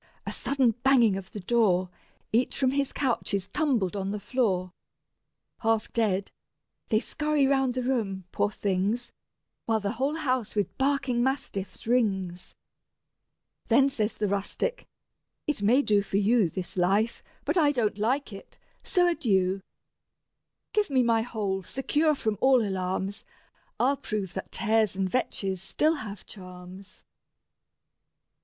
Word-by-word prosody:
a -, -, -3 dB
sudden 270 Hz, -4 st, +2 dB
banging 245 Hz, -6 st, +5 dB
of 190 Hz, -1 st, -7 dB
the 210 Hz, -, -6 dB
door: 185 Hz, -3 st, +2 dB, 0.5 s
Each 240 Hz, +3 st, +1 dB
from 260 Hz, -2 st, +2 dB
his 275 Hz, 0 st, 0 dB
couch 255 Hz, -6 st, 0 dB
is 195 Hz, -1 st, -2 dB
tumbled 235 Hz, -, 0 dB
on 195 Hz, -1 st, -2 dB
the 210 Hz, +1 st, -3 dB
floor: 190 Hz, -6 st, 0 dB, 0.9 s
Half 225 Hz, -1 st, 0 dB
dead, 200 Hz, -4 st, 0 dB, 0.6 s
they 215 Hz, -, +3 dB
scurry 300 Hz, +2 st, 0 dB
round 270 Hz, -2 st, +2 dB
the 255 Hz, -, -1 dB
room, 215 Hz, -7 st, -1 dB
poor 205 Hz, -, +1 dB
things, 205 Hz, +4 st, -1 dB, 0.6 s
While 225 Hz, -1 st, +2 dB
the 200 Hz, -1 st, -2 dB
whole 270 Hz, +6 st, -1 dB
house 255 Hz, -9 st, -1 dB
with 205 Hz, -1 st, -1 dB
barking 270 Hz, -3 st, +1 dB
mastiffs 205 Hz, -8 st, -3 dB
rings. 195 Hz, -7 st, 0 dB, 1.1 s
Then 275 Hz, 0 st, +5 dB
says 220 Hz, -4 st, -2 dB
the 210 Hz, -, 0 dB
rustic: 200 Hz, -, -2 dB, 0.6 s
"It 295 Hz, -8 st, -1 dB
may 245 Hz, +7 st, +4 dB
do 205 Hz, -4 st, +3 dB
for 200 Hz, -1 st, -2 dB
you, 205 Hz, -2 st, +3 dB
This 185 Hz, +1 st, -6 dB
life, 195 Hz, +5 st, +1 dB, 0.2 s
but 305 Hz, -, 0 dB
I 305 Hz, -5 st, +4 dB
don't 220 Hz, -6 st, 0 dB
like 245 Hz, +2 st, 0 dB
it; 195 Hz, -, -12 dB, 0.2 s
so 355 Hz, -1 st, +2 dB
adieu: 195 Hz, -, +1 dB, 1.1 s
Give 425 Hz, -4 st, +2 dB
me 260 Hz, -2 st, +3 dB
my 230 Hz, -1 st, +3 dB
hole, 210 Hz, -5 st, -2 dB
secure 295 Hz, -, +1 dB
from 220 Hz, -6 st, -2 dB
all 260 Hz, -5 st, +5 dB
alarms, 190 Hz, +1 st, -2 dB, 0.6 s
I'll 275 Hz, +3 st, +3 dB
prove 200 Hz, -6 st, -4 dB
that 190 Hz, -, -6 dB
tares 220 Hz, -3 st, +2 dB
and 190 Hz, 0 st, 0 dB
vetches 195 Hz, -4 st, -1 dB
still 305 Hz, +11 st, +2 dB
have 210 Hz, -6 st, -8 dB
charms." 185 Hz, 0 st, -11 dB
220 Hz, 140 wpm, -27 LUFS, 195-265 Hz, 1.1 s, banging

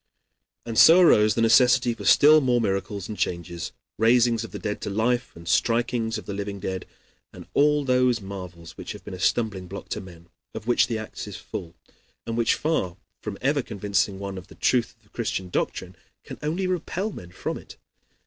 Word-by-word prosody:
And 115 Hz, -1 st, 0 dB
so 170 Hz, +3 st, +9 dB
arose 105 Hz, -, +5 dB
the 115 Hz, -, +2 dB
necessity 120 Hz, +1 st, +5 dB
for -, -, -9 dB
still 155 Hz, +1 st, +7 dB
more 125 Hz, -3 st, +2 dB
miracles 100 Hz, -2 st, -2 dB
and 110 Hz, -, -5 dB
changes, 85 Hz, -3 st, -3 dB, 0.3 s
raisings 115 Hz, 0 st, +4 dB
of 115 Hz, -, -7 dB
the -, -, -7 dB
dead 105 Hz, -1 st, -4 dB
to -, -, -3 dB
life, 120 Hz, +4 st, 0 dB
and 85 Hz, -, -12 dB
strikings 115 Hz, +3 st, +1 dB
of -, -, -8 dB
the 100 Hz, -, -5 dB
living 100 Hz, 0 st, -4 dB
dead, 95 Hz, -1 st, -4 dB, 0.4 s
and -, -, -11 dB
all 150 Hz, 0 st, +3 dB
those 125 Hz, -2 st, +3 dB
marvels 90 Hz, -5 st, -9 dB
which -, -, -6 dB
have -, -, -12 dB
been -, -, -7 dB
a 90 Hz, -, -7 dB
stumbling 100 Hz, -2 st, 0 dB
block 100 Hz, +2 st, -8 dB
to -, -, -3 dB
men, 85 Hz, -2 st, -13 dB, 0.3 s
of -, -, -6 dB
which 120 Hz, 0 st, +3 dB
the 115 Hz, -, -2 dB
Acts 110 Hz, 0 st, -7 dB
is -, -, -7 dB
full, 85 Hz, -1 st, -7 dB, 0.5 s
and 115 Hz, -, -3 dB
which, 115 Hz, -1 st, +2 dB
far 95 Hz, -, -1 dB, 0.2 s
from 105 Hz, -2 st, -5 dB
ever 140 Hz, +2 st, +2 dB
convincing 100 Hz, -3 st, -1 dB
one 100 Hz, -1 st, -5 dB
of 90 Hz, -, -14 dB
the -, -, -15 dB
truth 120 Hz, -2 st, +1 dB
of 115 Hz, -, -37 dB
the 105 Hz, -, -28 dB
Christian 95 Hz, -6 st, -3 dB
doctrine, -, -, -2 dB, 0.3 s
can -, -, -9 dB
only 165 Hz, +6 st, -1 dB
repel 185 Hz, +3 st, -2 dB
men 90 Hz, -, -10 dB
from 90 Hz, -, -5 dB
it. -, -, -14 dB
110 Hz, 200 wpm, -25 LUFS, 95-125 Hz, 0.5 s, so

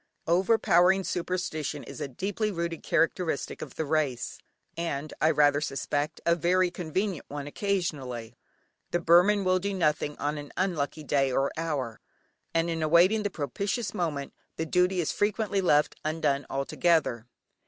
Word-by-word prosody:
Overpowering 185 Hz, 0 st, +4 dB
superstition 175 Hz, -5 st, -3 dB
is -, -, -9 dB
a 145 Hz, -, -2 dB
deeply 200 Hz, -, -2 dB
rooted 170 Hz, -3 st, -3 dB
characteristic 165 Hz, -1 st, 0 dB
of -, -, -8 dB
the 160 Hz, -, -2 dB
race, 145 Hz, -5 st, -1 dB, 0.4 s
and 155 Hz, -3 st, -3 dB
I 155 Hz, -, +5 dB
rather 145 Hz, -2 st, +4 dB
suspect, 145 Hz, +1 st, -2 dB
a 170 Hz, -, +5 dB
very 180 Hz, +2 st, +2 dB
convenient 180 Hz, +1 st, -2 dB
one 145 Hz, 0 st, -5 dB
occasionally. 145 Hz, -, -3 dB, 0.5 s
The 175 Hz, -, 0 dB
Burman 180 Hz, +5 st, +5 dB
will 185 Hz, 0 st, +3 dB
do 200 Hz, +1 st, -2 dB
nothing 150 Hz, -4 st, 0 dB
on 150 Hz, +1 st, -2 dB
an 145 Hz, -1 st, -10 dB
unlucky 160 Hz, -5 st, -1 dB
day 135 Hz, -2 st, +1 dB
or 135 Hz, +2 st, +1 dB
hour, 145 Hz, -9 st, -3 dB, 0.5 s
and 165 Hz, 0 st, +1 dB
in 165 Hz, -1 st, -2 dB
awaiting 170 Hz, +7 st, +4 dB
the 205 Hz, -, -1 dB
propitious 200 Hz, -, -3 dB
moment, 150 Hz, -6 st, -2 dB, 0.2 s
the 160 Hz, -, -2 dB
duty 180 Hz, +2 st, +2 dB
is 160 Hz, -, -1 dB
frequently 205 Hz, -1 st, 0 dB
left 150 Hz, -5 st, +3 dB
undone 150 Hz, -3 st, 0 dB
altogether. 140 Hz, -3 st, +1 dB
165 Hz, 145 wpm, -28 LUFS, 145-185 Hz, 0.5 s, I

